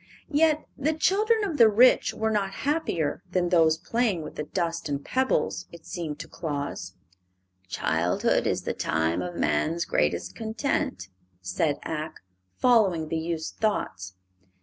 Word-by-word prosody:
Yet 310 Hz, +1 st, +3 dB
the 295 Hz, +3 st, 0 dB
children 425 Hz, +7 st, +2 dB
of 335 Hz, -9 st, -2 dB
the 230 Hz, -2 st, +8 dB
rich 240 Hz, +5 st, +5 dB
were 220 Hz, 0 st, -1 dB
not 205 Hz, -2 st, 0 dB, 0.2 s
happier 225 Hz, -, 0 dB
than 180 Hz, -1 st, +1 dB
those 160 Hz, -3 st, +4 dB
playing 205 Hz, -1 st, 0 dB
with -, -, -8 dB
the -, -, -5 dB
dust 170 Hz, +1 st, -2 dB
and 140 Hz, 0 st, -3 dB
pebbles, 260 Hz, -7 st, 0 dB
it 170 Hz, -1 st, -13 dB
seemed 160 Hz, -4 st, -5 dB
to -, -, -9 dB
Claus. 145 Hz, -, -5 dB, 0.7 s
"Childhood 85 Hz, -1 st, +1 dB
is -, -, -1 dB
the -, -, -2 dB
time 80 Hz, +2 st, 0 dB
of 90 Hz, -1 st, -5 dB
man's 155 Hz, -, 0 dB
greatest 85 Hz, +4 st, 0 dB
content," 220 Hz, -, -2 dB, 0.3 s
said 95 Hz, -, -1 dB
Ak, 155 Hz, -1 st, -5 dB, 0.4 s
following 195 Hz, -10 st, +3 dB
the 165 Hz, -, -1 dB
youth's 160 Hz, -1 st, -3 dB
thoughts. 95 Hz, -, -2 dB
170 Hz, 145 wpm, -26 LUFS, 145-230 Hz, 0.7 s, the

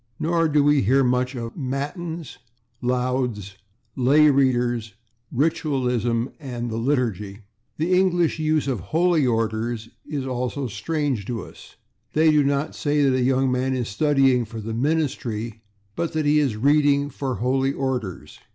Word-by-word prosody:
Nor 165 Hz, 0 st, +2 dB
do 150 Hz, -1 st, +3 dB
we 145 Hz, -1 st, +4 dB
hear 135 Hz, +6 st, +3 dB
much 125 Hz, +1 st, 0 dB
of 115 Hz, -1 st, -5 dB
/matins/, 155 Hz, +4 st, -5 dB, 0.4 s
/lauds/, 125 Hz, -5 st, -1 dB, 0.4 s
/lay 145 Hz, +4 st, +5 dB
readers/, 120 Hz, -5 st, +1 dB, 0.4 s
/ritualism/ 125 Hz, -5 st, 0 dB
and 120 Hz, -5 st, -5 dB
the 110 Hz, -, -2 dB
/liturgy/. 115 Hz, -6 st, -1 dB, 0.4 s
The 165 Hz, +4 st, 0 dB
English 175 Hz, -3 st, +2 dB
use 155 Hz, -2 st, +1 dB
of 115 Hz, -9 st, -2 dB
/holy 160 Hz, -, +2 dB
orders/ 115 Hz, 0 st, -2 dB, 0.2 s
is 140 Hz, -3 st, -3 dB
also 125 Hz, +2 st, -2 dB
strange 130 Hz, 0 st, -2 dB
to 120 Hz, -3 st, -3 dB
us. -, -, -14 dB, 0.4 s
They 155 Hz, +1 st, +4 dB
do 150 Hz, -1 st, +4 dB
not 140 Hz, +2 st, 0 dB
say 145 Hz, 0 st, +1 dB
that 135 Hz, -2 st, +3 dB
a 130 Hz, -, +1 dB
young 130 Hz, +1 st, +2 dB
man 130 Hz, +1 st, 0 dB
is 125 Hz, -3 st, -2 dB
/studying 135 Hz, 0 st, +2 dB
for 115 Hz, +1 st, -7 dB
the 110 Hz, +1 st, -5 dB
ministry/, 120 Hz, -5 st, -2 dB, 0.3 s
but 170 Hz, 0 st, -2 dB
that 155 Hz, -1 st, 0 dB
he 150 Hz, +1 st, +4 dB
is 135 Hz, -7 st, +1 dB
/reading 145 Hz, +3 st, +3 dB
for 135 Hz, -1 st, -3 dB
holy 130 Hz, +5 st, +1 dB
orders 130 Hz, -9 st, -4 dB
130 Hz, 150 wpm, -23 LUFS, 120-150 Hz, 0.4 s, lay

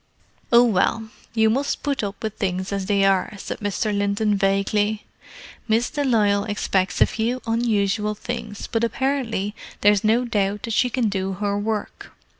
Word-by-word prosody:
"Oh, 235 Hz, 0 st, +7 dB
well, 220 Hz, 0 st, +1 dB, 0.2 s
you 220 Hz, -1 st, +4 dB
must 275 Hz, +4 st, -1 dB
put 280 Hz, -2 st, -1 dB
up 200 Hz, +1 st, -5 dB
with 215 Hz, -1 st, -3 dB
things 190 Hz, 0 st, -2 dB
as 195 Hz, -1 st, -2 dB
they 200 Hz, -1 st, +3 dB
are," 195 Hz, +1 st, +1 dB
said -, -, -6 dB
Mr. 205 Hz, +1 st, -1 dB
Linton 205 Hz, +1 st, +1 dB
vaguely. 205 Hz, +2 st, +1 dB, 0.6 s
"Miss 225 Hz, +2 st, +1 dB
de 290 Hz, -, -1 dB
Lisle 210 Hz, -6 st, +2 dB
expects 190 Hz, -3 st, -1 dB
a -, -, +9 dB
few 235 Hz, +3 st, -2 dB
unusual 210 Hz, -2 st, 0 dB
things, 220 Hz, -2 st, -6 dB
but 225 Hz, 0 st, -1 dB
apparently 235 Hz, -4 st, -1 dB, 0.3 s
there 205 Hz, -, +6 dB
is 205 Hz, -2 st, +1 dB
no 230 Hz, +3 st, +3 dB
doubt 205 Hz, -3 st, -1 dB
that 230 Hz, -, -3 dB
she 250 Hz, +3 st, +2 dB
can 245 Hz, -2 st, 0 dB
do 195 Hz, -1 st, -2 dB
her 200 Hz, +1 st, -1 dB
work. 210 Hz, +1 st, -4 dB
210 Hz, 170 wpm, -23 LUFS, 200-230 Hz, 0.6 s, a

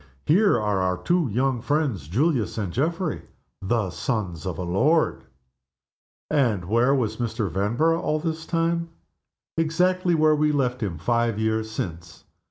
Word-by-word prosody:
Here 190 Hz, -, +4 dB
are 105 Hz, -2 st, 0 dB
our 90 Hz, -1 st, 0 dB
two 175 Hz, -, +1 dB
young 125 Hz, +2 st, 0 dB
friends, 130 Hz, -, -1 dB
Julius 125 Hz, -, 0 dB
and 100 Hz, -6 st, -3 dB
Geoffrey, 165 Hz, +4 st, -1 dB, 0.4 s
the 100 Hz, -1 st, 0 dB
sons 95 Hz, -, -3 dB
of 90 Hz, -3 st, -3 dB
a 90 Hz, -, -3 dB
lord!" 145 Hz, -, +1 dB, 1.0 s
And 120 Hz, -, +1 dB
where 120 Hz, +8 st, +3 dB
was 120 Hz, -6 st, -1 dB
Mr. 115 Hz, -3 st, -2 dB
Vanborough 120 Hz, -, +1 dB
all 155 Hz, -, 0 dB
this 160 Hz, 0 st, -4 dB
time? 170 Hz, 0 st, 0 dB, 0.7 s
Exactly 180 Hz, +2 st, +2 dB
where 155 Hz, -1 st, +4 dB
we 150 Hz, 0 st, +2 dB
left 130 Hz, -3 st, 0 dB
him 95 Hz, -7 st, -2 dB
five 115 Hz, +5 st, 0 dB
years 110 Hz, 0 st, 0 dB
since. 85 Hz, -5 st, -6 dB
120 Hz, 145 wpm, -24 LUFS, 105-160 Hz, 1.0 s, Here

